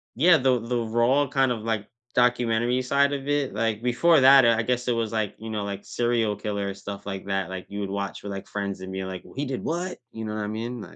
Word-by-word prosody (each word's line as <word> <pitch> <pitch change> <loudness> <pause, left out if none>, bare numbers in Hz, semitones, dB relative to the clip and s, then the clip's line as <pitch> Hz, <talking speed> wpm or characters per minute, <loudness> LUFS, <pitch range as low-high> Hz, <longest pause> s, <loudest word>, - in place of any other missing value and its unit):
Yeah, 165 +5 +6
the 130 -2 +2
the 120 +1 -2
raw 120 +5 +2
kind 135 -1 +2
of, 110 -3 -3
like, 110 -2 -2 0.3
documentary 120 0 +2
side 140 +2 +2
of 140 0 -4
it, 145 -6 0
like, 110 0 0
before 145 +6 +4
that, 135 -1 +8
I 115 -1 +4
I - - +3
guess 125 +1 -1
it 120 - +3
was, 115 -2 -1
like, 110 -3 -1
you 110 0 -7
know, 105 -2 -2
like, 100 0 -5
serial 115 -3 0
killer 100 -1 -3
stuff 100 0 -8
like 95 -1 -5
that, 95 -1 -1
like, 95 -1 -6
you 100 +1 -5
would 100 - -3
watch 100 0 -4
with, 100 - -5
like, 100 0 -6
friends 100 -2 -4
and 95 0 -7
being 95 0 -4
like, 95 -1 -6
w - - -15
“He 145 +2 -2
did 130 -1 -4
what?” 175 +3 -2
you 110 - -7
know 110 0 -4
what 105 - -2
I - - -3
mean? 115 +2 -4
115 Hz, 255 wpm, -25 LUFS, 100-125 Hz, 0.3 s, that